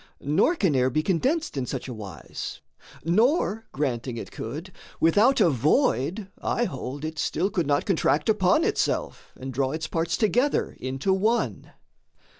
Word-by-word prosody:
Nor 160 Hz, -, +2 dB
can 185 Hz, -, +1 dB
air 130 Hz, 0 st, +3 dB
be 155 Hz, +4 st, 0 dB
condensed 265 Hz, -, 0 dB
in 130 Hz, -3 st, -2 dB
such -, -, -4 dB
a 125 Hz, -, -5 dB
wise; 95 Hz, -10 st, -7 dB, 0.4 s
Nor, 225 Hz, -, +2 dB
granting 125 Hz, -4 st, -2 dB
it -, -, -7 dB
could, 155 Hz, +11 st, -6 dB, 0.3 s
without 210 Hz, +11 st, +4 dB
a 180 Hz, -7 st, +5 dB
void, 155 Hz, -, +1 dB
I 240 Hz, -, 0 dB
hold, 140 Hz, -, -5 dB
It 155 Hz, -1 st, -5 dB
still 195 Hz, +3 st, 0 dB
could 170 Hz, -5 st, 0 dB
not 145 Hz, 0 st, +1 dB
contract -, -, +1 dB
upon -, -, +3 dB
itself -, -, -1 dB
And 130 Hz, 0 st, -6 dB
draw 135 Hz, +2 st, 0 dB
its 160 Hz, 0 st, -3 dB
parts 165 Hz, +1 st, -1 dB
together 245 Hz, +6 st, +1 dB
into 135 Hz, +9 st, -1 dB
one. 215 Hz, +5 st, 0 dB
160 Hz, 155 wpm, -25 LUFS, 135-205 Hz, 0.4 s, a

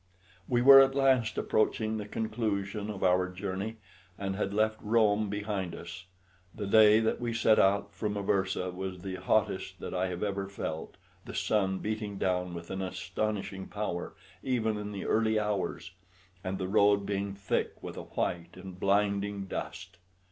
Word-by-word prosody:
We 120 Hz, -1 st, +2 dB
were 135 Hz, +1 st, +11 dB
at 135 Hz, 0 st, +5 dB
last 130 Hz, -4 st, +3 dB
approaching 110 Hz, 0 st, +1 dB
the 105 Hz, -1 st, -5 dB
conclusion 105 Hz, -2 st, -2 dB
of 100 Hz, -3 st, -5 dB
our 90 Hz, 0 st, +3 dB
journey, 95 Hz, +3 st, -4 dB, 0.4 s
and 95 Hz, -1 st, -3 dB
had 100 Hz, -1 st, -1 dB
left 110 Hz, +1 st, +1 dB
Rome 105 Hz, -1 st, +2 dB
behind 105 Hz, -3 st, -3 dB
us. 85 Hz, +1 st, -9 dB, 0.5 s
The 105 Hz, -, -4 dB
day 105 Hz, +1 st, +7 dB
that 110 Hz, +2 st, 0 dB
we 120 Hz, -1 st, -2 dB
set 110 Hz, -2 st, +4 dB
out 100 Hz, +1 st, +2 dB
from 105 Hz, -1 st, -2 dB
Aversa 95 Hz, -2 st, 0 dB
was 90 Hz, -1 st, -5 dB
the 95 Hz, -1 st, -4 dB
hottest 95 Hz, -1 st, 0 dB
that -, -, -6 dB
I 90 Hz, 0 st, 0 dB
have 90 Hz, +1 st, -4 dB
ever 100 Hz, -1 st, -2 dB
felt, 80 Hz, -5 st, -5 dB, 0.3 s
the -, -, -8 dB
sun 95 Hz, -3 st, +1 dB
beating 105 Hz, -1 st, -3 dB
down 90 Hz, -2 st, -1 dB
with 85 Hz, 0 st, -8 dB
an 95 Hz, 0 st, -3 dB
astonishing 95 Hz, +1 st, -3 dB
power 100 Hz, -4 st, -4 dB, 0.3 s
even 115 Hz, -4 st, 0 dB
in 105 Hz, 0 st, -5 dB
the 100 Hz, -2 st, -5 dB
early 110 Hz, -1 st, +2 dB
hours, 105 Hz, -2 st, -2 dB, 0.5 s
and 95 Hz, +1 st, -2 dB
the 95 Hz, -1 st, -3 dB
road 100 Hz, +1 st, +4 dB
being 100 Hz, 0 st, -2 dB
thick 100 Hz, -1 st, -1 dB
with -, -, -6 dB
a -, -, -5 dB
white 85 Hz, 0 st, -3 dB
and 95 Hz, -1 st, -9 dB
blinding 100 Hz, 0 st, +1 dB
dust. 95 Hz, -1 st, -6 dB
100 Hz, 165 wpm, -30 LUFS, 95-110 Hz, 0.5 s, were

